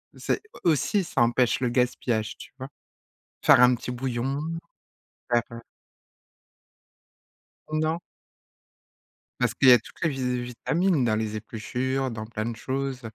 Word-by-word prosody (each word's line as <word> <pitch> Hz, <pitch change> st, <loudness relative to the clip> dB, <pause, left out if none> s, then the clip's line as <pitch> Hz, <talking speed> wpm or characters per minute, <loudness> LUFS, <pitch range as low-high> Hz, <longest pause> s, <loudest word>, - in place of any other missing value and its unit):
C'est -, -, -1 dB, 0.2 s
aussi, 175 Hz, +5 st, +2 dB
ça 140 Hz, -, -1 dB
empêche 120 Hz, +1 st, +2 dB
le 125 Hz, -, 0 dB
gaspillage, 120 Hz, -3 st, 0 dB
tu -, -, -12 dB
vois? 130 Hz, 0 st, -7 dB, 0.8 s
Faire -, -, +7 dB
un 125 Hz, 0 st, +7 dB
petit 125 Hz, +1 st, -5 dB
bouillon, 130 Hz, +2 st, -2 dB, 0.9 s
faire, 120 Hz, 0 st, +4 dB
heu 115 Hz, 0 st, -8 dB, 2.1 s
Non? 155 Hz, +2 st, 0 dB, 1.4 s
Parce 125 Hz, -2 st, +1 dB
qu'il 130 Hz, -, +5 dB
y -, -, +11 dB
a 125 Hz, -, +8 dB
toutes -, -, -16 dB
les 165 Hz, -, +3 dB
vi 125 Hz, -2 st, -1 dB
vitamines 155 Hz, +6 st, 0 dB
dans 110 Hz, -2 st, +2 dB
les 110 Hz, -1 st, -2 dB
épluchures, 125 Hz, +5 st, -2 dB
dans 110 Hz, -1 st, -5 dB
plein 110 Hz, -1 st, -4 dB
de 120 Hz, -, -3 dB
choses. 135 Hz, +2 st, -3 dB
125 Hz, 135 wpm, -26 LUFS, 115-135 Hz, 2.1 s, y